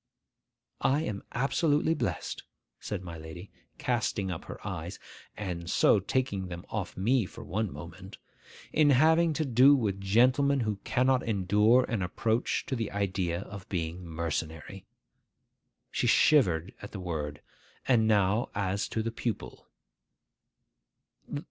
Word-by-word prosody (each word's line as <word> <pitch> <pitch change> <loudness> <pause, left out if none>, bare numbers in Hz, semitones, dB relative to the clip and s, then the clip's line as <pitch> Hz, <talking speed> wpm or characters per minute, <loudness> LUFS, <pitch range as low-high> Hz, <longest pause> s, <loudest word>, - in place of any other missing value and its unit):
'I 140 +3 +2
am 100 -9 -4
absolutely 145 +4 +2
blessed,' 165 - -3 0.4
said 90 - -5
my 85 -2 -8
lady, 80 +5 -10 0.3
casting 115 -6 -1
up 85 - -6
her - - -7
eyes - - -5 0.4
(and 90 -4 -4
so 105 - +4
taking 100 -2 -1
them 85 -1 -7
off - - -4
me 115 +2 +2
for - - -10
one 105 +2 -2
moment), 85 +6 -10 0.6
'in 155 -2 +5
having 160 +5 +5
to 155 +1 -1
do 130 +3 +6
with 100 -7 -1
gentlemen 130 +7 +3
who 105 -3 -1
cannot 125 +5 +1
endure 105 +3 +3
an 115 -5 -2
approach 110 +6 0
to 135 - -2
the 115 -3 -2
idea 95 -3 -1
of 100 -1 -10
being 85 0 -3
mercenary!' 80 -1 -4 1.0
She - - 0
shivered 95 - +4
at 100 - -9
the 100 - -5
word. 75 -5 -4 0.4
'And 115 -4 +4
now 105 +3 +2
as 100 0 -1
to 110 - -2
the 115 - -2
pupil. 115 0 -5
100 Hz, 135 wpm, -29 LUFS, 90-125 Hz, 1.0 s, do